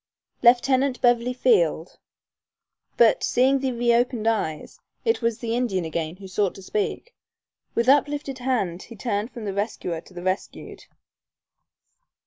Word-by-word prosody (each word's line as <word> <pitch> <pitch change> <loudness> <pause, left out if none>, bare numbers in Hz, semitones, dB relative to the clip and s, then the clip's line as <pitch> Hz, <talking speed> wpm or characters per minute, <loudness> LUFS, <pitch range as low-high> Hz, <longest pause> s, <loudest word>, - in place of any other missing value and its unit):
Lieutenant 255 +2 +3
Beverly 240 0 +2
Field; 450 - +1 1.0
but, - - +4
seeing 265 +2 +3
the 265 -1 -1
reopened 240 -1 +1
eyes 185 -9 -2 0.3
it 455 - +1
was 230 -1 0
the 230 -1 -3
Indian 210 -8 -1
again 160 0 -3
who 195 +1 -11
sought 190 0 -1
to 195 - -11
speak. 215 - -3 0.6
With 235 +1 +1
uplifted 285 -1 +2
hand 220 -9 -1
he 230 - -11
turned 210 0 -2
from 235 -4 -8
the 200 - -3
rescuer 195 -5 -3
to 185 - -19
the 175 - -7
rescued. 185 +1 -4
235 Hz, 135 wpm, -24 LUFS, 195-255 Hz, 1.0 s, but